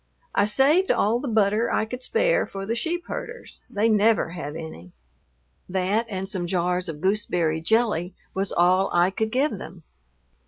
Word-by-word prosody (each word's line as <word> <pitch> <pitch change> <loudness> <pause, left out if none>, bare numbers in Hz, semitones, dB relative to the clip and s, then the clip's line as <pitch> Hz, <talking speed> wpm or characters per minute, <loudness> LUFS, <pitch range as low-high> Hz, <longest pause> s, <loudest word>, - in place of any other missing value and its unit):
I 200 - +3
saved 280 - +3
all 225 +4 +2
the 275 - -5
butter 220 0 +2
I - - +1
could 250 +3 -7
spare - - +1
for 195 0 -6
the 225 - -1
sheep 345 +8 -2
herders; 475 +1 -7
they 210 +2 +1
never 215 -3 +3
have 155 -4 -6
any. 160 - -9 0.8
That 190 +5 0
and 190 -2 -4
some 180 -3 -4
jars 180 0 0
of 150 -2 -7
gooseberry 175 -5 0
jelly 190 -3 +1 0.2
was 195 0 -2
all 185 +2 +3
I 175 +2 +3
could 220 +3 -1
give 260 -3 0
them. 175 -4 -10
200 Hz, 165 wpm, -24 LUFS, 180-230 Hz, 0.8 s, I